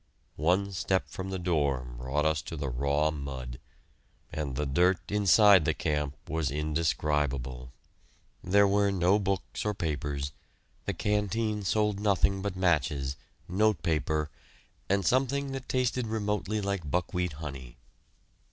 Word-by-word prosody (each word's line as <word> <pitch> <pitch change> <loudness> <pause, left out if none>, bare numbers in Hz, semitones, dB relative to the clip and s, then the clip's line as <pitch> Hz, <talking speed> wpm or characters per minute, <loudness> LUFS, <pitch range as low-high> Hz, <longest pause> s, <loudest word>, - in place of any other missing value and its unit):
One 95 +5 +2
step 95 +1 0
from 95 0 -5
the 95 - -2
door 75 -8 0
brought 65 +5 -1
us 80 0 +2
to 80 - -7
the 70 -2 -2
raw 70 +5 +1
mud, 65 -4 -6 0.7
and 70 -4 -3
the 75 - -1
dirt 90 +9 +2
inside 100 -2 +6
the - - +1
camp 75 -2 -1
was 80 -3 -1
indescribable. 75 -4 -1 0.7
There 100 +2 +5
were 100 0 +3
no 95 +2 +3
books 95 -11 -2
or 105 -1 -1
papers; 75 -5 -2 0.5
the - - -2
canteen 105 +1 0
sold 105 +1 +1
nothing 100 -1 +2
but 100 -1 -3
matches, 75 -7 +1 0.3
notepaper, 80 -7 +1 0.6
and 100 -1 +2
something 135 +2 +1
that 135 -1 -6
tasted 125 -1 0
remotely 105 -1 -1
like 100 -6 -2
buckwheat 90 0 -1
honey. 70 -5 -8
85 Hz, 130 wpm, -29 LUFS, 75-100 Hz, 0.7 s, inside